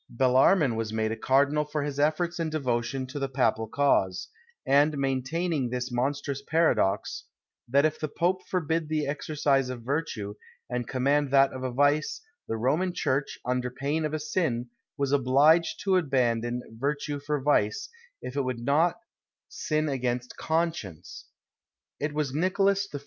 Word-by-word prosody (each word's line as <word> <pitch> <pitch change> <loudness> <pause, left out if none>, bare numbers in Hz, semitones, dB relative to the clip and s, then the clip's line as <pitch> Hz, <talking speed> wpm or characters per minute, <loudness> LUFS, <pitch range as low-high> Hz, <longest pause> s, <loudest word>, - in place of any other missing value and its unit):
Bellarmin 130 +3 +3
was 110 -1 -3
made 110 0 -1
a - - -1
cardinal 140 +5 +2
for 150 0 -3
his 145 -1 -4
efforts 170 +4 +1
and 165 -1 -1
devotion 130 -3 -1
to 130 +3 -6
the 135 -1 -2
papal 125 -4 +1
cause, 135 - +1 0.4
and 145 +2 +3
maintaining 135 +2 -1
this 125 +1 -3
monstrous 140 +2 -2
paradox, 140 -11 +1 0.4
that 140 +4 +3
if 155 0 0
the 155 - -2
pope 175 +5 0
forbid 165 -3 -1
the 155 -1 0
exercise 140 -2 0
of 125 -2 -6
virtue, 125 -7 -3 0.3
and 125 -2 -3
command 140 +2 +1
that 135 0 +4
of 130 -1 -4
vice, 145 +2 +2 0.3
the 115 - -2
Roman 155 +10 +1
church, 135 +2 -1
under 125 0 -1
pain 140 +5 -2
of 155 0 -1
a - - -2
sin, 145 -7 -1 0.3
was 140 -1 0
obliged 145 +5 +4
to 190 -2 +3
abandon 125 -6 0 0.2
virtue 145 +1 -2
for 145 +1 -2
vice, 150 - +1 0.4
if 125 - -6
it 140 - +1
would 130 -2 -3
not 160 +6 +3 0.5
sin 155 - -1
against 125 -3 -2
conscience! 160 - -3 0.7
It 150 +1 -1
was 145 -3 -2
Nicholas 195 +4 +2
I. 145 - -5
140 Hz, 155 wpm, -27 LUFS, 125-155 Hz, 0.7 s, that